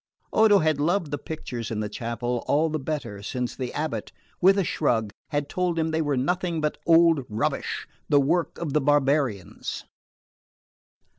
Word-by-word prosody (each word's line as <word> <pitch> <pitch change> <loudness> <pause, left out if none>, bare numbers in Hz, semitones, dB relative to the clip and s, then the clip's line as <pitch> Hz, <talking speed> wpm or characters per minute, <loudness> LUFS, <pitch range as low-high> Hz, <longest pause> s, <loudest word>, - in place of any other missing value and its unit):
Odo 215 -2 +6
had 155 -5 +2
loved 170 +1 +1
the 145 - -2
pictures 125 -8 -5
in 110 - -3
the 105 - -1
chapel 120 +2 -3
all 155 +3 +3
the 155 - -1
better 135 -8 -4
since 125 +4 -3
the 125 -2 -4
abate, 155 +1 -3 0.3
with 195 +2 +6
a 195 - +3
shrug, 115 - 0 0.2
had 145 -2 -1
told 180 +1 -1
him 160 0 0
they 160 0 +1
were 145 -3 0
nothing 175 +5 0
but 150 -1 -1
old 165 -3 +5
rubbish, 110 +1 -2 0.2
the 145 - +5
work 165 +5 +1
of 155 -5 -3
the 150 - +3
barbarians. 135 - 0
145 Hz, 165 wpm, -25 LUFS, 125-165 Hz, 0.3 s, Odo